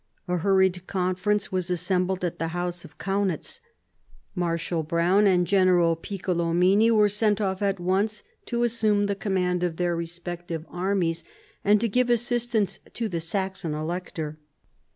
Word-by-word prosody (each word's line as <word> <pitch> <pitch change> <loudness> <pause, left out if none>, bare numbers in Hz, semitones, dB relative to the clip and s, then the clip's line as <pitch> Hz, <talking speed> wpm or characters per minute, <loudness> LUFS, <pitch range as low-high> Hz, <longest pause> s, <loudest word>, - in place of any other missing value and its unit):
A 180 0 0
hurried 190 0 +2
conference 190 +2 0
was 185 -1 -1
assembled 180 +1 0
at 175 - -4
the 165 - -1
house 175 0 -3
of 150 - -14
Kaunitz; 195 - -2 0.7
Marshal 170 -2 -1
Browne 170 +6 +3
and 180 -2 +3
General 180 -3 +4
Piccolomini 180 +3 +2
were 215 -2 +5
sent 210 0 +1
off 190 -2 -1
at 195 -2 0
once 200 +4 0 0.2
to 235 0 -1
assume 220 -3 +2
the 200 - 0
command 180 -3 0
of 170 -2 -1
their 175 -1 0
respective 170 -1 -5
armies, 180 -2 -1 0.4
and 205 +1 +5
to 235 - +2
give 245 +3 +1
assistance 240 -3 0 0.2
to 230 - -1
the 170 -3 -3
Saxon 190 -1 -3
Elector. 155 -1 -4
185 Hz, 145 wpm, -26 LUFS, 175-205 Hz, 0.7 s, were